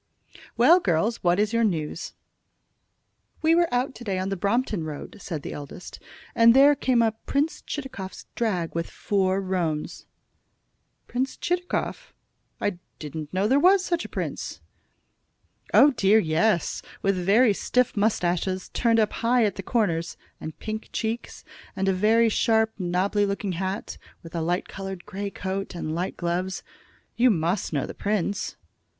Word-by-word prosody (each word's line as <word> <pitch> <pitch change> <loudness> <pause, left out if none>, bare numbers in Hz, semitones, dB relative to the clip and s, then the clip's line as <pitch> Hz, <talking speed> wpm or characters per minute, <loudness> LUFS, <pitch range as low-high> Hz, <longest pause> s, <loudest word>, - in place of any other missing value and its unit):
"Well, 315 +10 +7
girls, 200 - +1
what 175 +1 +2
is 210 +2 +1
your 230 0 +3
news?" 165 -6 -2 1.3
"We 320 +1 +5
were 340 0 +3
out 250 +2 0
to 245 - -10
day 195 -4 -2
on 185 +1 -2
the 195 - -1
Brompton 205 0 0
Road," 155 +7 -7
said 160 -7 -5
the - - -5
eldest, 145 +5 -9 0.3
"and 230 +1 +6
there 280 +2 +7
came 255 -4 +2
up 220 -1 -1
Prince 290 +3 0
Chitakov's 260 -10 -6
drag 185 -8 -1
with 165 0 -2
four 190 -2 0
roans." 175 -5 -2 1.0
"Prince 260 +2 -2
Chitakov! 355 0 -2 0.4
I 200 -4 -2 0.2
didn't 150 0 -7
know 190 +2 +1
there 265 +5 +4
was 370 +3 +5
such 345 -1 0
a - - -8
prince." - - -4 1.1
"Oh, 290 - +7
dear, 210 -4 +4
yes; 170 0 +1 0.2
with 195 0 +2
very 205 +6 +4
stiff 250 +4 +1
mustaches, 185 -3 0
turned 230 -2 +2
up 215 -1 +2
high 235 0 +2
at 205 - 0
the - - -5
corners, 170 -8 -1 0.2
and 155 - -7
pink 220 0 -5
cheeks, 225 +1 -4 0.3
and 195 0 -1
a 190 - +3
very 220 +5 +4
sharp, 220 0 +2
nobby 185 +3 +1
looking 200 0 -2
hat, 190 +3 -4 0.2
with 165 - -11
a 170 - -2
light 175 +3 -1
colored 195 -2 -7
grey 200 0 -4
coat, 195 -1 -4
and 155 -2 -3
light 175 +3 -3
gloves. 180 +2 -2 0.5
You 250 +2 +4
must 175 -1 0
know 140 -4 0
the - - -7
prince." 205 -1 -2
200 Hz, 155 wpm, -25 LUFS, 180-230 Hz, 1.3 s, Well